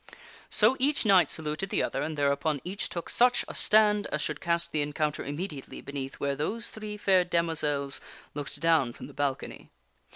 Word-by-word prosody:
So 220 +5 +4
each 280 0 +2
knight 195 -4 +5
saluted 155 +4 -1
the - - +1
other, - - -2
and 155 -1 -3
thereupon 140 +1 +1
each 190 +3 -3
took 170 - -5
such 245 +1 +3
a - - -7
stand 210 -1 +3
as 150 - -2
should 150 -1 -3
cast 170 0 0
the 155 - +1
encounter 150 +1 -1
immediately 145 -1 -6
beneath 135 -1 -6
where 140 0 -2
those 215 +11 -2
three 215 -1 -7
fair 190 -3 +3
demoiselles 155 -5 0 0.3
looked 145 -1 -6
down 160 -7 +2
from - - -10
the - - -12
balcony. 140 -2 -3
160 Hz, 175 wpm, -28 LUFS, 145-200 Hz, 0.3 s, knight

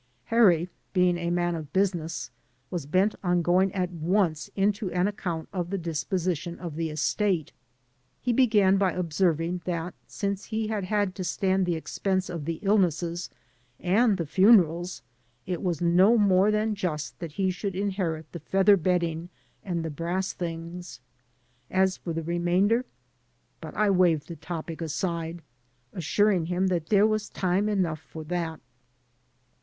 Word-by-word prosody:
Harry, 180 -8 +5 0.3
being 180 -2 +3
a 170 0 -2
man 175 0 +1
of 155 -3 -6
business, 170 - -1 0.4
was 170 -6 -4
bent 185 +7 +2
on 175 -1 +2
going 185 +3 +3
at 180 -2 -1
once 170 -1 0
into 200 0 +1
an 180 +2 +1
account 175 -6 -4
of 175 -3 -2
the 195 - -1
disposition 170 0 -2
of 170 -4 -6
the 165 0 -2
estate. 165 +2 0 0.7
He 245 - 0
began 210 -6 +4
by 190 -3 +2
observing 170 0 0
that 175 -1 -3
since 200 -1 -3
he 220 -1 -2
had 210 -3 -2
had 205 -1 0
to 185 - -5
stand 190 +1 +1
^e 175 - +1
expense 185 +3 -2
of 165 -4 -5
the 165 0 -2
illnesses 175 -4 +1 0.5
and 205 +4 +3
the 170 - -2
funerals, 180 -1 +4 0.4
it 180 -2 -3
was 175 -4 -1
no 185 +7 +5
more 195 -1 +4
than 215 +1 +1
just 160 -7 -3
that 165 -4 -6
he 190 +2 +1
should 190 +1 -4
inherit 185 -6 -2
the 170 - -7
feather 195 +3 +4
bedding 170 -1 0 0.3
and 170 -4 -2
the 160 - -3
brass 175 +5 -2
things. 170 +1 -6 0.7
As 190 0 +2
for 170 - -5
the 165 0 -3
remainder 175 +8 +2 0.4
— - - -43
but - - -8
I 210 -1 +3
waved 175 -5 +3
the 170 - -5
topic 165 -1 -6
aside, 165 +1 -3 0.5
assuring 185 0 +1
him 180 +2 +1
that 170 -3 -1
there 205 -1 +5
was 215 -1 0
time 190 +3 0
enough 180 -7 0
for 160 0 -9
that. 165 -1 -3
180 Hz, 155 wpm, -27 LUFS, 165-195 Hz, 0.7 s, Harry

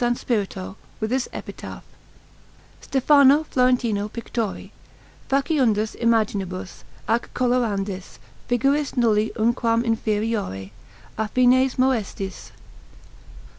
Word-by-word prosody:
Spirito, 200 -5 -3 0.2
with 220 +1 -2
this 260 -1 0
epitaph: - - -8 1.0
STEPHANO 280 +2 +5
FLORENTINO 245 -7 +1
PICTORI, 230 -2 -4 0.6
FACIUNDIS 260 -7 +1
IMAGINIBUS 205 -6 -1 0.2
AC 230 +1 +2
COLORANDIS 210 -7 -1 0.3
FIGURIS 275 +4 +1
NULLI 220 -2 +2
UNQUAM 230 0 +1
INFERIORI, 215 - -1 0.5
AFFINES 255 +4 +3
MOESTISS. 220 -7 -1
230 Hz, 75 wpm, -23 LUFS, 210-255 Hz, 1.0 s, STEPHANO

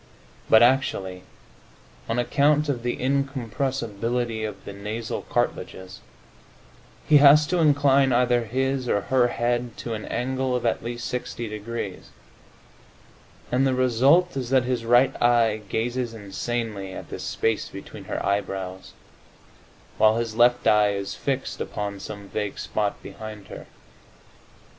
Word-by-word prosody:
But 110 +1 +7
actually, 100 -8 +1 0.9
on 115 - 0
account 145 +4 +2
of 125 -4 -1
the 120 0 -2
incompressibility 125 -4 -2
of 105 -2 -6
the 100 - -7
nasal 105 +3 -4
cartilages, 95 0 -3 1.1
he 150 - +7
has 145 +1 +7
to 180 +3 0
incline 140 -3 +4
either 120 -1 +2
his 130 +2 -1
or 100 - +2
her 125 +2 +2
head 120 0 -1
to 115 - -5
an 110 -1 -5
angle 130 +1 -1
of 125 - -2
at 115 - 0
least 120 +1 -4
60 120 -1 -4
degrees, 105 -2 -6 1.4
and 130 +2 +3
the 130 - +1
result 130 +8 +3
is 130 -3 -3
that 130 -1 +4
his 125 -2 -2
right 120 +3 +4
eye 115 -3 +3
gazes 120 +1 -2
insanely 105 -1 -4
at - - -8
the - - -5
space 115 -2 -1
between - - -10
her - - -3
eyebrows, 95 -2 -3 1.1
while 110 +1 +5
his 115 -2 -2
left 120 +1 +4
eye 105 -1 +4
is 100 0 -4
fixed 135 -1 -3
upon 100 -1 -4
some 100 0 -8
vague 105 -1 -4
spot 105 -1 -2
behind 110 -2 -9
her. - - -9
120 Hz, 135 wpm, -24 LUFS, 105-130 Hz, 1.4 s, But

